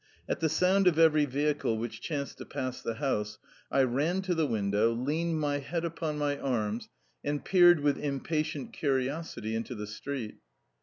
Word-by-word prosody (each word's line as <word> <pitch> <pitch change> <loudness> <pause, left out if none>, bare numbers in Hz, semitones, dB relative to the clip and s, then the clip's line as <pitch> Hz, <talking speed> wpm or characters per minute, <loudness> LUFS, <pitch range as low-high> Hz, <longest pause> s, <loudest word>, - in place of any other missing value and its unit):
At - - -1
the 160 - +1
sound 185 +4 +3
of 170 -3 +4
every 155 -2 +5
vehicle 145 -3 0
which 110 0 -5
chanced 145 -4 -4
to - - -7
pass 130 -1 -4
the 115 - -3
house 110 -6 -1 0.3
I 135 - +3
ran 150 +10 +1
to 185 -1 0
the 160 -3 +1
window, 105 0 +2
leaned 155 +7 -1
my 145 -1 0
head 165 +4 -3
upon 160 -2 -3
my 145 -1 0
arms, 115 -4 -1 0.3
and 145 0 -2
peered 175 -4 +6
with 145 -1 +2
impatient 155 - -2
curiosity 135 - -1
into 115 +2 -3
the 105 -1 -5
street. 110 +2 -5
145 Hz, 170 wpm, -30 LUFS, 120-160 Hz, 0.3 s, peered